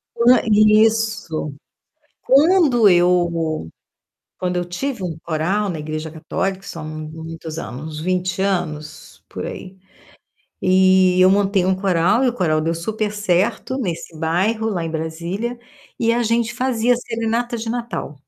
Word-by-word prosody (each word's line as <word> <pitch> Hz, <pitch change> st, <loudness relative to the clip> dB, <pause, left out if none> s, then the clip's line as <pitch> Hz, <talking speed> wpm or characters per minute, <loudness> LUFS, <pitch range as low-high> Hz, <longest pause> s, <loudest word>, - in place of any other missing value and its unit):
Quan 245 Hz, +2 st, +5 dB
isso. 215 Hz, -7 st, +2 dB, 0.7 s
Quando 275 Hz, -, +5 dB
eu 170 Hz, -, +2 dB, 0.7 s
quando 180 Hz, 0 st, -2 dB
eu 175 Hz, -, 0 dB
tive 220 Hz, +4 st, -4 dB
um 165 Hz, -3 st, -4 dB
coral 175 Hz, +6 st, -1 dB
na 165 Hz, -4 st, -4 dB
igreja 155 Hz, +1 st, -5 dB
católica, 190 Hz, +4 st, -3 dB
são 165 Hz, -5 st, -7 dB
muitos 160 Hz, +1 st, -7 dB
anos, 150 Hz, +5 st, -7 dB
uns -, -, -4 dB
20 185 Hz, +2 st, -1 dB
anos, 155 Hz, -6 st, -3 dB
por -, -, -6 dB
aí. 190 Hz, +1 st, -8 dB, 0.8 s
E 185 Hz, 0 st, +4 dB
eu 185 Hz, -, +7 dB
montei 195 Hz, -1 st, +2 dB
um 190 Hz, -, +3 dB
coral, 190 Hz, +5 st, +2 dB
e -, -, +3 dB
o -, -, -5 dB
coral 160 Hz, -8 st, +1 dB
deu 165 Hz, +2 st, 0 dB
super 215 Hz, +5 st, -2 dB
certo 205 Hz, +6 st, 0 dB
nesse 170 Hz, -7 st, -4 dB
bairro, 195 Hz, +8 st, 0 dB
lá 175 Hz, -6 st, -2 dB
em 165 Hz, -, -4 dB
Brasília, 170 Hz, +9 st, -4 dB, 0.4 s
e 230 Hz, -1 st, +2 dB
a 240 Hz, -, +1 dB
gente 230 Hz, +1 st, 0 dB
fazia 245 Hz, -1 st, +1 dB
serenata 235 Hz, 0 st, -2 dB
de 225 Hz, 0 st, -5 dB
Natal. 230 Hz, -, -4 dB
185 Hz, 140 wpm, -20 LUFS, 165-225 Hz, 0.8 s, eu